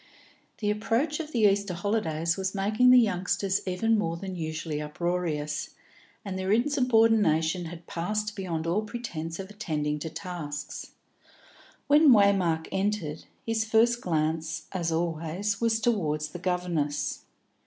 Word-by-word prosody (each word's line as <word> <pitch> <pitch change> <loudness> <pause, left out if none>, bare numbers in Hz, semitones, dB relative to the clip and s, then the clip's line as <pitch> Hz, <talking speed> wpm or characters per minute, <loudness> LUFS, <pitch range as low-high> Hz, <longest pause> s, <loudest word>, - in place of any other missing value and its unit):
The 210 -1 0
approach 230 +9 0
of 310 -1 -5
the 235 - 0
Easter 200 -2 +1
holidays 170 -4 0
was 190 0 -3
making 215 +6 +3
the 250 - +8
youngsters 195 -2 +1
even 220 +4 +2
more 165 -4 -1
than 190 +1 -6
usually 155 -2 -3
uproarious, 150 -1 -2 0.5
and 190 -1 -4
their 190 +1 -1
insubordination 225 - +3
had 170 +1 -9
passed 210 +5 -2
beyond 170 -5 -3
all 175 +6 +1
pretence 170 -8 -5
of 195 +1 -7
attending 150 -8 -2
to 160 - -4
tasks. 150 -6 -6 0.9
When 295 +1 +6
Waymark 195 -7 +4
entered, 190 -6 -2 0.2
his 225 -1 +1
first 230 +2 +3
glance, 160 -1 -1
as 170 -3 -1
always, 170 +5 -1
was 225 -1 +2
towards 155 -10 0
the 175 - -8
governess. 165 -6 -1
185 Hz, 130 wpm, -28 LUFS, 160-215 Hz, 0.9 s, the